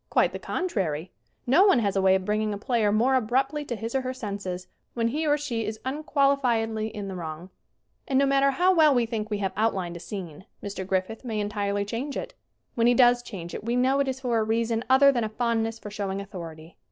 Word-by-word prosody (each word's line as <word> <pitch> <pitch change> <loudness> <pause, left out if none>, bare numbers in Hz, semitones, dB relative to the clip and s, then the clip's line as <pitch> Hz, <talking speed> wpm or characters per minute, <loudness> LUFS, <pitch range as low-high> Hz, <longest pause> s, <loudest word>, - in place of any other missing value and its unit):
Quite - - +2
the - - -5
contrary! 185 - -2 0.3
No 300 +11 +5
one 385 - +5
has 205 -4 0
a 195 - +2
way 190 0 +5
of 190 -1 -1
bringing 210 0 0
a - - -5
player 225 -1 +1
more 235 +6 +3
abruptly 265 +5 +1
to 240 - -3
his 225 +1 -5
or 265 - +1
her 255 0 -4
senses 200 -6 -5 0.3
when 230 -1 +1
he 310 +5 -1
or 295 0 +3
she 250 -6 -3
is 215 +1 -4
unquali 280 0 +1
fiedly 225 -3 0
in 210 -3 -6
the 190 - -5
wrong. 170 0 -7 0.6
And 265 - +1
no 275 - +4
matter 275 0 +3
how 360 +7 +3
well 310 -5 +5
we 240 -1 +3
think 220 -2 -4
we 210 - -1
have 195 -2 -2
outlined 190 -5 0
a - - -6
scene 180 -3 -7 0.2
Mr. 195 -2 -5
Griffith 190 +5 -2
may 225 -4 -3
entirely 205 -1 -1
change 250 +7 -4
it. - - -5 0.4
When 235 0 +2
he 245 - +5
does 245 0 +5
change 175 -8 -8
it - - -6
we 235 +2 -1
know 260 +2 +2
it 280 - +1
is 265 0 -3
for 240 -3 +1
a - - +2
reason 225 +1 0
other 275 +2 +7
than 240 -4 0
a 215 - -2
fondness 225 0 -1
for 210 -2 -9
showing 200 -2 -3
authority. 165 -4 -9
225 Hz, 235 wpm, -26 LUFS, 200-260 Hz, 0.6 s, other